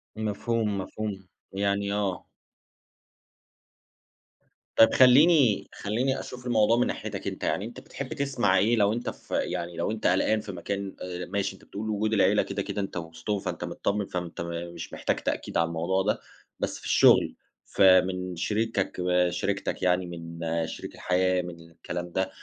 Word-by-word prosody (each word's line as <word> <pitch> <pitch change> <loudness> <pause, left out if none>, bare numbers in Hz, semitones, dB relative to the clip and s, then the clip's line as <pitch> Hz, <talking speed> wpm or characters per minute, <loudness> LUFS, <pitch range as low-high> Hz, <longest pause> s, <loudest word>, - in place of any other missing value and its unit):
مفهوم 110 0 -1
مفهوم، 95 0 -5 0.3
يعني 100 0 0
آه. 100 -3 -1 2.5
طَب 115 - +7
خلّيني 130 - +6
خلّيني 125 +6 -1
أشوف 125 0 -8
الموضوع 115 -1 +3
من 125 - +3
ناحيتك - - -4
أنت، - - -5
يعني 100 - 0
أنت 120 - -8
بتحب 140 +2 -7
تسمع 135 -10 +1
إيه 110 +5 +3
لو 105 -1 +3
أنت 120 - -3
ف - - -12
يعني 85 -1 -2
لو 85 - -1
أنت 110 0 -1
قلقان 95 +4 +3
في 105 -1 -7
مكان، 100 +2 -4
آآ، 90 0 -5
ماشي 100 +1 -2
أنت - - -19
بتقول 110 +2 -5
وجود 110 +1 0
العيلة 105 0 +4
كده 100 0 -3
كده 100 +1 -3
أنت 95 - -4
وسطهم 85 +5 -3
فأنت 90 -3 -4
متطمِّن، 100 0 -1
فأنت 90 -3 -5
م 85 0 -5
مش 85 -1 -8
محتاج - - 0
تأكيد - - -3
على 85 0 +3
الموضوع 85 +4 0
ده، 105 +2 0 0.4
بس - - -2
في - - -13
الشغل، - - +5 0.3
فمِن 90 -1 +4
شريكك 105 +1 -1
آآ، 90 0 +2
شريكتك 100 +2 -2
يعني، 90 0 +2
من 85 -1 -8 0.3
شريك - - -7
الحياة، 90 0 +1
من 85 -1 -10
الكلام 85 +1 -6
ده، 95 - 0
آآ، 95 - -2
100 Hz, 165 wpm, -27 LUFS, 90-110 Hz, 2.5 s, طَب